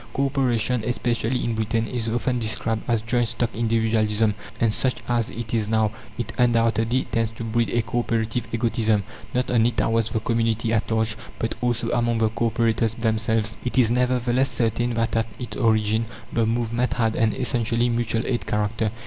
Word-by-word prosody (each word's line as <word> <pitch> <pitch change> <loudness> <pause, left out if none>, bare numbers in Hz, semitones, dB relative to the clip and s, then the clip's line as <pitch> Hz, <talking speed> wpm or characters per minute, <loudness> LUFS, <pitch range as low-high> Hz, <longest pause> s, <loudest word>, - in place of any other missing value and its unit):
Co 140 - +2
operation, 125 -4 +1
especially 120 +1 -1
in 115 - 0
Britain, 110 +1 0
is 115 -2 -2
often 120 +2 0
described 110 0 -1
as 115 -2 +1
"joint 120 0 +1
stock 115 +1 -1
individualism"; 110 -1 +1 0.3
and 115 -2 +2
such 130 +2 +1
as 120 -2 +1
it 115 -1 -6
is 110 -2 0
now, 110 -1 +2 0.3
it 120 -1 -4
undoubtedly 115 +1 +2
tends 115 -1 +1
to 115 +1 -8
breed 115 +1 0
a 120 -1 +1
co 120 +2 -1
operative 115 0 -1
egotism, 110 -2 +1 0.3
not 125 0 0
only 115 -1 +4
towards 115 -1 +1
the 110 - -1
community 115 0 0
at 110 - 0
large, 110 -1 +1 0.2
but 115 - -2
also 120 -1 0
among 120 -1 +1
the 110 -1 +2
co 115 +1 0
operators 115 -1 +1
themselves. 110 -1 0
It 125 - -3
is, 120 -3 +5
nevertheless, 125 +1 +2
certain 120 +1 0
that 115 0 0
at 115 0 +1
its 125 - -6
origin 110 -1 +2 0.3
the 115 -1 +2
movement 115 +2 0
had 115 -2 +1
an 110 -2 +2
essentially 120 -2 0
mutual 115 -1 0
aid 120 -2 -2
character. 105 +1 0
115 Hz, 180 wpm, -24 LUFS, 110-120 Hz, 0.3 s, is